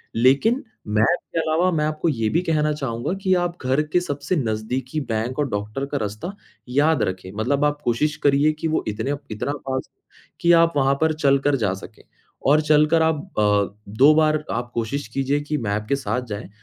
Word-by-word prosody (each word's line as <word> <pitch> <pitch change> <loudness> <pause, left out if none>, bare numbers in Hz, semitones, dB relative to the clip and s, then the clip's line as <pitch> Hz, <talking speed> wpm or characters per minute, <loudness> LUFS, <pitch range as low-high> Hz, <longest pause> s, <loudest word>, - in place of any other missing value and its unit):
लेकिन 140 - +3 0.2
मैप 105 +10 +2 0.2
के - - +2
अलावा 160 +3 +2
मैं 150 -2 +1
आपको 155 +2 -1
ये 115 -6 0
भी 170 - +1
कहना 150 -1 +2
चाहूँगा 130 0 -3
कि 185 -1 +3
आप 175 0 -1
घर 130 +3 +2
के 180 - +5
सबसे 145 +1 -2
नज़दीकी 125 +4 -2
बैंक 115 +5 -2
और 145 -3 0
डॉक्टर 105 +6 -3
का 140 0 -3
रास्ता 110 - -4 0.3
याद 150 +5 +2
रखें, 95 0 -4
मतलब 140 +6 +1
आप 145 0 -1
कोशिश 150 +6 +1
करिए 145 +2 +4
कि 165 - -1
वो 160 - 0
इतने 105 +6 -2 0.2
इतना 110 +6 -2 0.2
पास 130 0 -3
हो - - -51 0.4
कि 170 - +4
आप 165 0 +5
वहाँ 135 0 +3
पर 160 0 +3
चलकर 140 -1 +2
जा 100 -6 0
सकें। 100 +3 -11 0.4
और 150 +2 +5
चलकर 150 +2 +4
आप 160 0 +3 0.2
अ, 105 -1 +2
2 135 +9 +5
बार 155 -1 +2
आप 120 0 -3
कोशिश 120 +4 -3
कीजिए 135 +3 0
कि 150 +1 -2
मैप 105 -3 -2
के 140 - +3
साथ 125 -2 -2
जाएँ, 105 -2 -6
140 Hz, 195 wpm, -22 LUFS, 115-155 Hz, 0.4 s, के